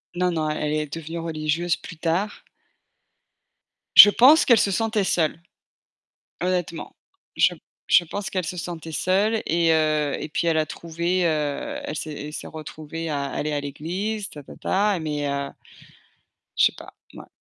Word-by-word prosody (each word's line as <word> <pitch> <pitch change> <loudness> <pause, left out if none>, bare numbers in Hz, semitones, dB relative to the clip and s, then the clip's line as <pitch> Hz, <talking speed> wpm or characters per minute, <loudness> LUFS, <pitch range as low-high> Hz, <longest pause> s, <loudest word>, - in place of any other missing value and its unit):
Non, 180 0 +1
non, 155 -2 -1
elle 150 0 -2
est 150 -1 -2
devenue 165 +1 -6
religieuse, 165 +1 -1
plus 170 - -11
tard. 175 +6 -2 1.5
Je 205 - +12
pense 270 +9 +6
qu'elle 235 -4 +6
se 200 - +2
sentait 220 0 0
seule, 165 -3 0 1.0
honnêtement. 180 -2 -3 0.4
Je - - +4 0.4
je 175 - +6
pense 200 +4 -5
qu'elle 185 -2 -2
se 180 +3 -5
sentait 165 -1 -6
seule, 205 +7 +1
et 165 0 +2
heu, 155 -2 +1
et - - -5
puis 160 - -2
elle 160 -1 +2
a 155 - +1
trouvé, 170 +3 -2
heu, 155 - -1
elle 290 - -5
s'est 150 -1 -5
elle 150 - -8
s'est - - -6
retrouvée 160 +1 -7
à 145 -2 -2
aller 150 +2 -3
à 145 - -1
l'église, 185 +9 -4
ta 145 - -11
ta - - -13
ta, 200 0 +1
mais 150 -2 -3
heu 140 0 -2 1.1
Je - - +6
sais - - +4
pas, - - -12 0.2
mouais. - - -11
165 Hz, 165 wpm, -23 LUFS, 155-185 Hz, 1.5 s, Je